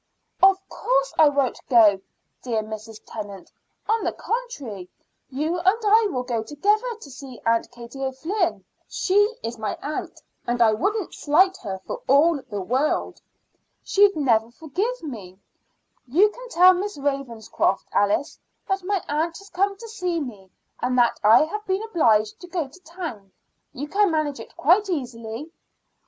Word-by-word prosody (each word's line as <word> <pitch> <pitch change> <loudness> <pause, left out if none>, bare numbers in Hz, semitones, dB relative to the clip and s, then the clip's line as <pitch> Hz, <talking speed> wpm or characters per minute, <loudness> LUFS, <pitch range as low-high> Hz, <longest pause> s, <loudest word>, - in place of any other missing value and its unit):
"Of 385 0 +7
course - - 0
I 310 - +8
won't 275 -3 0
go, 215 -6 +6 0.4
dear 225 -4 -1
Mrs. 215 0 -8
Tennant. 205 -4 -8 0.4
On 445 +1 +1
the - - 0
contrary, 275 - -5 0.4
you 305 +6 -1
and 375 +5 +3
I 435 +1 +5
will 250 -8 -2
go 240 -3 -2
together 415 - 0
to 285 - -12
see 260 -2 -10
Aunt 230 0 +2
Katie 240 +3 -9
O'Flynn. 330 +8 -1 0.2
She 370 - -2 0.3
is 230 0 -5
my 215 -1 -3
aunt, 300 +1 -5 0.3
and 240 0 0
I 225 -2 +5
wouldn't 400 - -1
slight 370 +6 +3
her 195 - -5
for - - -5
all 290 +2 +4
the 205 -5 -6
world. 255 +10 -1 0.6
She'd 400 -1 +4
never 230 -7 +2
forgive 360 - -3
me. 205 - -8 0.7
You 360 - +4
can - - -11
tell 365 -4 +7
Miss 400 +1 -3
Ravenscroft, 275 -8 -1
Alice, 205 +7 +1 0.3
that 385 -1 0
my 395 0 -1
aunt 320 +3 -1
has 395 0 -14
come 395 +2 0
to 460 +3 -10
see 360 -6 -2
me, 210 -10 -7 0.3
and 250 +1 0
that 240 -1 +3
I 220 +6 +7
have 420 +7 -4
been 380 +2 0
obliged 225 - +2
to 355 - -9
go 345 -5 -2
to 280 +7 -17
town. 325 - -8 0.4
You 285 +3 -6
can 405 +5 +3
manage 310 -5 -1
it 225 - -12
quite 380 +8 +3
easily." 250 -2 -5
290 Hz, 160 wpm, -24 LUFS, 230-375 Hz, 0.7 s, I